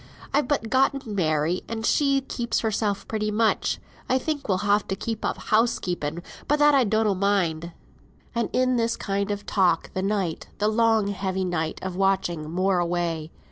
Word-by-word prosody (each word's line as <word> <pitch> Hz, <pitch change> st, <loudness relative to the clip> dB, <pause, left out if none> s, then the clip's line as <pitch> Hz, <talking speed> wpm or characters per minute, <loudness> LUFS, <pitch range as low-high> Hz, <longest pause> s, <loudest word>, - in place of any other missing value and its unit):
I've 285 Hz, -2 st, +2 dB
but 260 Hz, -6 st, -1 dB
gotten 265 Hz, -3 st, +1 dB
Mary, 160 Hz, -2 st, +1 dB
and 225 Hz, -1 st, -4 dB
she 275 Hz, 0 st, +3 dB
keeps 240 Hz, -3 st, -2 dB
hersel 215 Hz, -2 st, 0 dB
pretty 215 Hz, -1 st, -1 dB
much. 220 Hz, +1 st, +1 dB, 0.3 s
I 260 Hz, -, +4 dB
think 290 Hz, -2 st, -3 dB
we'll 190 Hz, -, +3 dB
ha' 205 Hz, 0 st, +4 dB
to 195 Hz, -, -1 dB
give 220 Hz, +2 st, -4 dB
up -, -, -1 dB
house 225 Hz, +2 st, +2 dB
keeping; 170 Hz, -2 st, -3 dB, 0.2 s
but 295 Hz, -, +3 dB
that 295 Hz, 0 st, +5 dB
I 270 Hz, -3 st, +4 dB
donnot 215 Hz, -2 st, +1 dB
mind." 175 Hz, -5 st, +1 dB, 0.6 s
And 235 Hz, -3 st, -1 dB
in 255 Hz, 0 st, +2 dB
this 230 Hz, 0 st, 0 dB
kind 200 Hz, 0 st, -2 dB
of 205 Hz, 0 st, -3 dB
talk 180 Hz, -5 st, +1 dB
the 185 Hz, -, -1 dB
night, 195 Hz, -4 st, -1 dB
the 210 Hz, +1 st, +2 dB
long 220 Hz, -2 st, +3 dB
heavy 190 Hz, -1 st, -2 dB
night 160 Hz, -3 st, -2 dB
of 190 Hz, -1 st, -4 dB
watching, 175 Hz, -4 st, 0 dB
wore 185 Hz, 0 st, +2 dB
away. 170 Hz, -2 st, -1 dB
205 Hz, 180 wpm, -25 LUFS, 180-230 Hz, 0.6 s, that